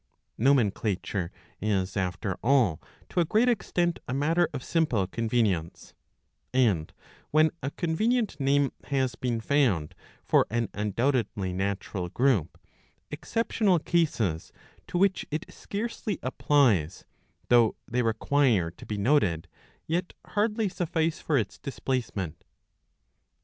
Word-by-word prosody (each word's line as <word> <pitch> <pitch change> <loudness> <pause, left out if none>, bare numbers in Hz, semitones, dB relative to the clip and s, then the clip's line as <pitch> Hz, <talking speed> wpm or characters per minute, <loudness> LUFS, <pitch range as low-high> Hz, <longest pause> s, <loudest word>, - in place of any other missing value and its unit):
Nomenclature 105 -7 +1 0.3
is 95 -2 0
after 95 +1 -1
all 120 - +3 0.3
to - - -1
a 170 - +4
great 220 +9 +3
extent 175 -7 0
a 125 - -2
matter 165 +5 +2
of 140 -3 -5
simple 150 - +1
convenience; 105 -5 -1 0.6
and, 105 -12 +2 0.4
when 155 +1 +4
a 135 - -2
convenient 215 - 0
name 140 0 +2
has 130 -3 0
been 120 -1 -2
found 115 - +1 0.3
for - - +3
an 115 -1 -1
undoubtedly 105 -2 0
natural 95 -1 -3
group, 120 - +1 0.5
exceptional 215 -4 +1
cases 145 - 0 0.4
to - - -2
which 195 +1 +2
it 155 +1 -3
scarcely 215 -1 -4
applies, 120 - +2 0.4
though 120 -3 +5
they 125 +1 0
require 115 -5 +2
to - - -14
be 105 - -3
noted, 100 - +2 0.4
yet 175 +3 -2 0.2
hardly 215 +1 +1
suffice 165 -3 -1
for 150 - +1
its 110 -5 -2
displacement. 115 - -3
125 Hz, 115 wpm, -27 LUFS, 100-160 Hz, 0.6 s, though